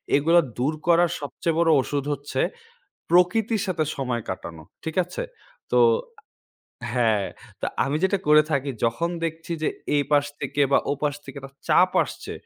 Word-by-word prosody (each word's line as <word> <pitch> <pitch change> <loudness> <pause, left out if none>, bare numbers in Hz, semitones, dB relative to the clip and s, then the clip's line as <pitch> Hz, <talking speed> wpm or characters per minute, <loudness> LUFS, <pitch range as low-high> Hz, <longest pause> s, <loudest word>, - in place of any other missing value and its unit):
এগুলো 165 +4 +5 0.2
দূর 140 +6 0
করার 170 0 +4
সবচেয়ে 160 +4 -2
বড় 170 -1 +3
ওষুধ 140 +1 -2
হচ্ছে, 145 +1 -3 0.7
প্রকৃতির 205 +5 +3
সাথে 175 -4 0
সময় 125 -4 -2
কাটানো। 85 -3 -6 0.2
ঠিক 160 +1 -4
আছে? 180 - -5 0.5
তো - - +4 1.1
আ - - -3
হ্যাঁ, 110 -5 +2 0.3
তো - - -1 0.2
আমি 140 +2 -1
যেটা 195 +1 +2
করে 150 0 +7
থাকি 140 -1 0
যখন 140 +10 0
দেখছি 165 +1 -4
যে, - - +2 0.3
এই 145 - +3
পাশ 145 -1 +4 0.2
থেকে 140 +1 0
বা - - +6
ও - - +2
পাশ 145 -1 +1
থেকে 135 - -10
একটা 135 0 -11 0.2
চাপ - - +5
আসছে, - - -8
145 Hz, 165 wpm, -24 LUFS, 135-170 Hz, 1.1 s, করে